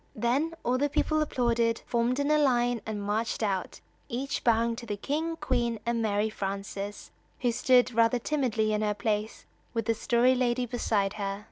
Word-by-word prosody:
Then 270 +9 0
all 250 +1 +1
the 290 +1 +1
people 310 +2 +1
applauded, 235 -5 +1
formed 240 +2 0
in 285 - +1
line 245 -6 +2
and 210 -2 -3
marched 220 +3 -1
out, 195 -3 -2 0.3
each 265 +3 -3
bowing 230 0 +2
to 235 -1 -8
the 205 -1 -3
King, 315 +9 -2
Queen 240 -6 -1
and 235 0 0
Mary 210 -1 +1
Frances, 200 0 -5 0.3
who 245 -2 +2
stood 250 +1 +3
rather 230 +2 +3
timidly 235 -5 0
in 210 - 0
her 210 -1 0
place 210 +1 -2 0.3
with 225 -1 0
the 230 - +2
Story 240 +3 +3
Lady 250 -1 +1
beside 215 -4 0
her. 195 0 -2
235 Hz, 170 wpm, -28 LUFS, 215-255 Hz, 0.3 s, stood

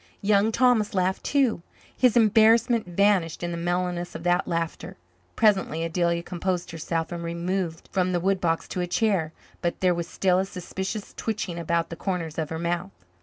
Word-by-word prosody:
Young 205 +1 +3
Thomas 230 -4 +3
laughed 185 0 0
too. 265 -10 +1 0.3
His 250 -2 +3
embarrassment 225 0 +4
vanished 180 -2 +1
in 175 - -2
the - - -3
mellowness 175 0 -2
of 165 - -6
that 175 0 +2
laughter. 165 -1 -3 0.4
Presently 190 -7 +2
Adelia 170 0 0
composed 180 0 -3
herself 165 0 -3
and 170 -1 -5
removed 170 0 -3
from 185 -1 +1
the 175 - +1
woodbox 175 -3 0
to 180 - -2
a 175 - -1
chair, 180 -4 +1 0.3
but 175 - -2
there 180 -1 +3
was 170 0 -3
still 185 0 +1
a 190 - 0
suspicious 190 +3 -5
twitching 200 -6 -3
about 170 0 0
the - - -4
corners 165 -3 -3
of 155 -2 -2
her 160 - -4
mouth. 170 - -4
180 Hz, 170 wpm, -25 LUFS, 170-200 Hz, 0.4 s, embarrassment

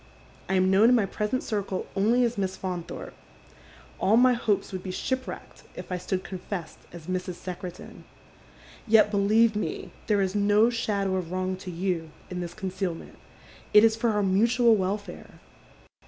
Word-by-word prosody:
I 190 - +1
am 185 0 +3
known 205 +4 +6
in 250 - +5
my 220 -4 +3
present 210 +6 -2
circle 200 -4 -3
only 225 +6 +3
as 240 0 0
Miss 190 -2 -2
Faunthorpe. 180 -3 -6 0.9
All 215 +4 +4
my 250 +1 +6
hopes 220 -5 0
would 185 -1 -5
be 185 - -7
ship 260 +7 -2
wrecked - - -9
if - - -9
I 180 - -1
stood 185 +1 -3
confessed 185 -2 -6
as 170 -2 -11
Mrs. 180 0 -3
Secretan. 180 0 -8 0.8
Yet, 215 -1 +5
beUeve 215 +2 +3
me, 210 - -4 0.2
there 210 -2 +2
is 190 -1 -2
no 210 +3 +4
shadow 200 -5 -1
of 175 -2 -4
wrong 185 0 -1
to 185 0 -8
you 175 -2 -2 0.2
in 180 - -4
this 175 -1 -6
concealment. 190 -4 -5 0.6
It 210 - +9
is 225 -1 +5
for 230 +1 0
our 210 -2 +1
mutual 230 +5 +4
welfare. 205 +1 -4
195 Hz, 170 wpm, -27 LUFS, 185-220 Hz, 0.9 s, It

